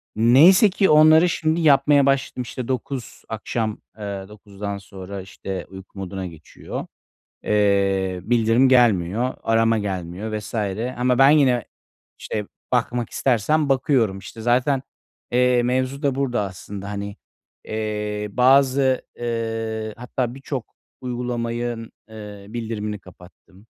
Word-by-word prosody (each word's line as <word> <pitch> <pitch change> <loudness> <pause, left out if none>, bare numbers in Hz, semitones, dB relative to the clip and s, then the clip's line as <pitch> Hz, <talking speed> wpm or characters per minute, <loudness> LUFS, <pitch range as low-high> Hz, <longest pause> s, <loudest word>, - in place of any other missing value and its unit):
Neyse 150 - +6
ki 195 +1 +2
onları 155 +3 +6
şimdi 160 0 0
yapmaya 145 -2 +5
başladım. 135 -2 0
İşte, 125 +1 -6
9 130 -1 -4
akşam, 110 0 -3 0.2
ııı, 100 -2 -6
9'dan 100 -1 -7
sonra, 95 0 -8
işte, 95 0 -6
uyku 95 +1 -12
moduna 95 0 -5
geçiyor. 80 -3 -8 0.6
Eee, 100 -3 +1
bildirim 115 +4 +3
gelmiyor, 120 -1 +3
arama 115 0 +2
gelmiyor 100 +2 -4
vs. 105 +1 -10 0.4
ama 125 +1 +1
ben 135 +1 +7
yine, 130 -6 +4 0.5
işte, 105 -2 -4 0.3
bakmak 120 -1 0
istersem 140 +5 +1
bakıyorum, 130 -7 +2
işte. 110 - -10
Zaten, 125 +3 +2 0.5
eee, 125 0 +3
mevzu 130 +3 -1
da 140 -2 +1
burada 130 -5 0
aslında. 100 +1 -7
Hani, 100 0 -5 0.5
eee, 105 -1 -3
bazı, 130 +1 +4
eee, 115 -2 -3
hatta 125 0 -3
birçok 135 -2 -6 0.3
uygulamanın, 120 -2 -3 0.2
eee, 105 -2 -10
bildirimini 110 -2 -4
kapattım. 95 +2 -18
115 Hz, 115 wpm, -22 LUFS, 100-130 Hz, 0.6 s, ben